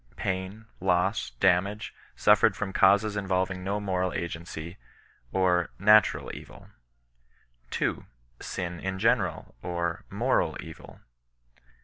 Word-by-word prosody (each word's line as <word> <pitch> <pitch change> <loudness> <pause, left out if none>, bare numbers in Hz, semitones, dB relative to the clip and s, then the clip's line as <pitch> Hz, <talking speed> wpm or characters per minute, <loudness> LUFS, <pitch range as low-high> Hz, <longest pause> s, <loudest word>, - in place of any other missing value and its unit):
Pain, 95 +4 -3
loss, 95 +2 +1
damage, 100 +3 +2 0.2
suffered 105 0 +4
from 95 -1 -4
causes 100 +2 +4
involving 95 -2 -1
no 100 +2 -1
moral 95 -2 -1
agency, 85 +1 -5 0.5
or 90 -2 +2
natural 105 +2 +4
evil, - - -12 1.0
2. - - -2 0.3
Sin 90 -2 -5
in 95 +1 -3
general, 110 -3 +1
or 85 -1 -3
moral - - +1
eoil. - - -11
95 Hz, 100 wpm, -28 LUFS, 90-100 Hz, 1.0 s, suffered